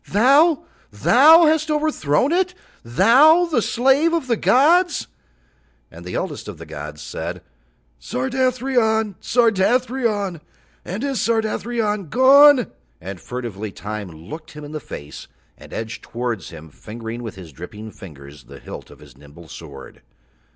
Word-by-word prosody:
Thou, 285 - +4 0.3
thou 320 +6 +6
hast 315 0 +1
overthrown 295 - 0
it? 365 +1 0 0.3
Thou, 250 - +5
the 310 -8 0
slave 270 +9 +2
of 335 -5 0
the 240 -2 +1
gods?" 325 - +3 0.9
And 85 +1 -12
the 90 - -5
oldest - - -5
of - - -8
the - - -10
gods 75 +1 -8
said: 85 +3 -6 0.6
"Sardathrion, 230 - 0
Sardathrion, 225 - 0 0.4
and 195 +7 -5
is 275 -3 -2
Sardathrion 220 -3 -1
gone?" 270 - +6 0.3
And 95 +1 -8
furtively 110 -4 -6
Time 105 -1 -7
looked 85 - -11
him 150 0 -10
in 145 - -9
the 155 - -5
face 75 - -10 0.3
and - - -16
edged 110 0 -6
towards 120 -6 -5
him 80 0 -12
fingering 115 +6 -8
with 115 -3 -7
his 90 -5 -11
dripping 105 +9 -10
fingers 70 - -13
the - - -13
hilt - - -10
of - - -15
his 70 -4 -17
nimble 75 +4 -16
sword. 70 -5 -12
200 Hz, 135 wpm, -20 LUFS, -, 0.9 s, thou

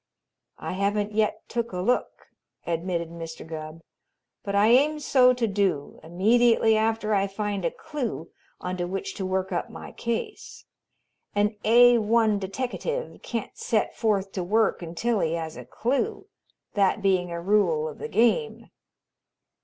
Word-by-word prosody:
"I - - -5
haven't 205 +2 0
yet 215 0 0
took 235 -1 -3
a 180 - -5
look," 245 +7 -1 0.4
admitted 170 0 -2
Mr. 165 -1 -8
Gubb, 160 0 -7 0.6
"but 200 0 -3
I 205 +2 +5
aim 290 +5 +4
so 260 -3 +5
to 245 -2 0
do 195 -8 -1
immediately 225 +6 +3
after 220 0 +1
I 200 -1 +2
find 200 -1 -3
a 170 - +2
clue 240 - -5 0.3
onto 180 -1 -3
which 190 +1 -4
to 190 - -2
work 190 0 -1
up - - -2
my - - -9
case. 235 - -5 0.7
An 205 +1 +2
A 240 +2 +6
1 220 -1 +2
deteckative 255 - -4
can't 230 -3 -5
set 220 -2 -1
forth 200 -4 0
to 185 - -3
work 215 +4 +1
until 190 +7 -1
he 165 -2 0
has 160 -1 -4
a 125 - -9
clue, 280 - -2 0.5
that 200 +1 +2
being 185 -2 +2
a 170 0 -4
rule 175 -5 +2
of 150 - -8
the - - -4
game." 240 - +1
205 Hz, 150 wpm, -26 LUFS, 180-230 Hz, 0.7 s, A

